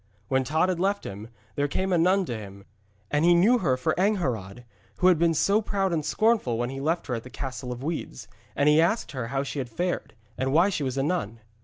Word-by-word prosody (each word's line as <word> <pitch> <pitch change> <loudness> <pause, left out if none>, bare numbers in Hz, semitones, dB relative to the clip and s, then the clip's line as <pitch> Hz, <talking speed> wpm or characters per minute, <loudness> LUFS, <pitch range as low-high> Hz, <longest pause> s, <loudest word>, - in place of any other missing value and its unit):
When 130 0 +2
Tod 160 +6 +1
had 185 -2 -1
left 200 +2 0
him, 100 +3 -7 0.3
there 145 0 0
came 190 +6 -1
a - - +4
nun 185 +3 +3
to 120 - -4
him, 100 -2 -10 0.5
and 150 +1 +2
he 175 +1 +6
knew 220 +8 +4
her 135 - +1
for 155 +5 0
Angharad, 125 - -1 0.3
who - - 0
had 175 -4 +3
been 165 -1 +3
so 200 +7 +3
proud 195 -3 -1
and 155 -2 0
scornful 215 - +1
when 120 +2 -2
he 135 - -6
left 165 +4 0
her 130 - -3
at 115 - -2
the 125 - -11
Castle 130 -1 -6
of 125 +1 -6
Weeds. 155 - -5 0.3
And 140 - +2
he 150 +1 +6
asked 185 +5 0
her 130 -5 -4
how 135 +2 -1
she 140 +1 -5
had 125 -2 -4
fared, 175 +5 -3 0.2
and 130 +1 0
why 170 +7 +4
she 170 - -2
was 135 -1 -2
a 135 - +1
nun. 125 - -2
150 Hz, 240 wpm, -26 LUFS, 125-180 Hz, 0.5 s, he